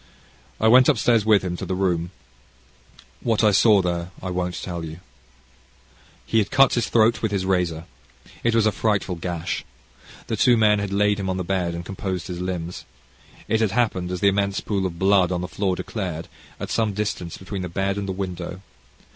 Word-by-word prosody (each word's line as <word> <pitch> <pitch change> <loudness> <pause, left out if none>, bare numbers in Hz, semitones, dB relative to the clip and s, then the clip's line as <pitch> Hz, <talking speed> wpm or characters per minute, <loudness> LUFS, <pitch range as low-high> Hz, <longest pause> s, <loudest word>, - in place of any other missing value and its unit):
I 110 - +3
went 125 +4 +7
upstairs 115 -5 +3
with 105 -3 +5
him 90 -1 -2
to - - -5
the 95 - -1
room 90 -3 0 1.1
what 115 -2 +1
I 105 - +6
saw 105 -1 +5
there 85 -1 -2
I 95 - -5
won't 90 -1 -2
tell 85 -2 -5
you. 80 +1 -7 1.3
He 115 - +2
had 105 - 0
cut 135 -1 +5
his 120 - 0
throat 115 0 +3
with 110 - -1
his 95 -2 -1
razor. 90 -3 0 0.6
It 115 -1 +2
was 115 -2 +4
a 110 - +4
frightful 105 -2 0
gash. 85 0 -3 0.6
The - - -2
two 120 -1 +4
men 105 -2 +4
had 100 -1 -3
laid 105 +1 +2
him 95 -1 -2
on 95 - -1
the 90 - -2
bed, 90 -2 -1
and 85 +1 -6
composed 95 -2 -4
his 90 -1 -5
limbs. 90 -1 -4 0.6
It 110 - +1
had 105 -4 +1
happened, 100 -7 0
as 90 -1 -4
the 100 - +4
immense 100 0 0
pool 100 -3 -1
of 85 -2 -8
blood 95 -1 +3
on 90 -1 -1
the 90 - -3
floor 95 -1 -1
declared, 90 -6 -5 0.3
at - - -5
some 110 -3 +1
distance 100 -4 -3
between 95 0 -6
the 90 - -4
bed 95 +3 -1
and 100 -1 -4
the - - -2
window. 90 -1 -5
95 Hz, 200 wpm, -23 LUFS, 90-105 Hz, 1.3 s, went